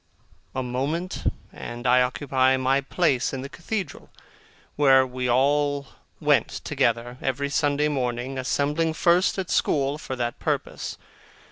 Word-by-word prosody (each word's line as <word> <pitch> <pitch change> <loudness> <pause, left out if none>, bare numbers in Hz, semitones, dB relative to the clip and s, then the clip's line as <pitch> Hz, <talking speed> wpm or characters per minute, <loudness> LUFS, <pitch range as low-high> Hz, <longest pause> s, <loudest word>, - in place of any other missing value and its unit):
A 130 - -1
moment, 145 +9 -2 0.2
and 120 +1 -7
I 125 0 +5
occupy 130 0 +2
my 130 +1 +2
place 140 -3 +1
in 135 - -3
the 140 - -7
Cathedral, 190 +5 -5 0.7
where 135 -2 +5
we 125 0 -3
all 140 +2 +2 0.3
went - - +3
together, 120 +2 -1
every 140 +1 -1
Sunday 145 0 +2
morning, 130 -2 -2
assembling 150 +5 0
first 175 +4 +3
at 190 -2 -3
school 140 0 +1
for 130 - -5
that 120 -1 -3
purpose. - - -3
135 Hz, 130 wpm, -25 LUFS, 125-145 Hz, 0.7 s, I